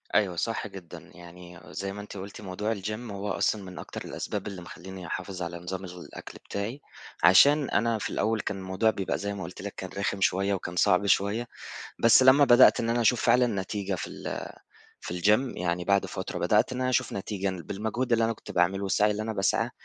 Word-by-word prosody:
أيوه، 95 -4 +3
صح 115 +5 -2
جدًا. 95 -4 -11
يعني 85 0 -12
زي 95 +1 -5
ما 105 - -7
أنتِ 105 0 -9
قُلتِ 100 +2 -8
موضوع 105 +3 -2
الGym 105 +3 -5
هو 100 +1 -4
أصلًا 105 -2 0
من 95 -1 -9
أكتر - - -7
الأسباب 105 0 -4
اللي 95 -3 -6
مخلّيني 90 0 -9
أحافظ 95 +1 -5
على 85 0 -4
نظام 95 +2 -5
الغ 90 0 -9
الأكل - - -10
بتاعي؛ 105 +7 -3 0.4
عشان 140 +11 +6
أنا 115 +2 +1
في - - -4
الأول 110 0 0
كان 100 - -3
الموضوع 95 +4 +1
بيبقى 100 -3 -2
زي 100 0 -3
ما 100 - -6
قُلت 90 +3 -8
لِك 100 0 -6
كان 95 - -6
رِخم 100 -1 -1
شوية 95 +2 +2
وكان 90 -2 -4
صعب 90 +3 +3
شوية 100 +4 +1 0.5
بس 115 +3 +6
لمّا 130 +3 +7
بدأت 120 0 +7
إن 115 - -1
أنا 120 +1 +1
أشوف 120 +1 +3
فعلًا 125 0 +5
نتيجة 100 0 -3
في 80 - -5
ال - - -6 0.6
في 90 0 -5
الGym 110 +5 +2
يعني 90 0 -1
بعد 100 +1 +2
فترة - - -5
بدأت - - +2
إن 125 - -3
أنا 130 0 +1
أشوف 130 -1 +1
نتيجة 100 0 -3
بالمجهود 110 +6 -3
اللي 115 0 +4
أنا 115 - +1
كنت - - -12
باعمله 95 +3 +1
والسعي 105 +2 +2
اللي 105 +1 -2
أنا 110 0 -3
باسعاه 95 -2 +1
100 Hz, 210 wpm, -27 LUFS, 95-110 Hz, 0.6 s, لمّا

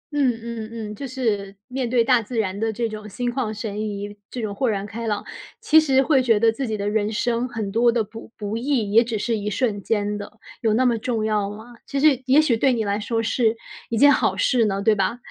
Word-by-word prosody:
嗯， 275 -4 +3
嗯， 230 -2 -5 0.2
嗯， - - -7
就 275 +5 -6
是 210 -7 -2
面 255 -1 -3
对 240 -1 +3
大 245 0 +4
自 230 +2 -6
然 200 -2 -1
的 225 0 0
这 230 +1 -2
种 210 -1 -8
心 245 +4 -2
旷 245 -5 -1
神 210 -1 -4
怡， 205 -1 -4
这 245 -3 -5
种 205 - -3
豁 245 +4 0
然 200 -1 -2
开 225 +2 -6
朗， 210 -1 -2 0.3
其 315 -8 +5
实 270 -3 +3
会 275 -2 +3
觉 230 -4 +3
得 225 +1 +4
自 250 +3 -4
己 215 - -2
的 205 0 -3
人 210 0 0
生 235 +2 -1
很 215 -4 -4
多 235 +2 +4
的 230 -1 +1
不 225 +2 -11
不 210 +1 -4
易 235 -4 0
也 230 +2 +6
只 230 -2 -3
是 230 +2 -1
一 210 +1 -3
瞬 210 -2 -1
间 205 0 -1
的， 205 - -8 0.3
有 220 -2 +2
那 255 +3 +3
么 235 -2 +2
重 225 -2 -1
要 210 -2 0
吗？ 220 +4 -10
其 275 - -2
实 280 -4 +4
也 265 +3 +6
许 290 -7 +3
对 255 +3 +2
你 225 -2 0
来 200 +1 0
说 225 +2 -1
是 225 0 +1 0.3
一 230 - -1
件 285 +4 +7
好 - - +1
事 245 -3 +3
呢， 200 -1 -1
对 220 - +5
吧？ 200 +4 0
225 Hz, 265 characters per minute, -23 LUFS, 210-245 Hz, 0.3 s, 件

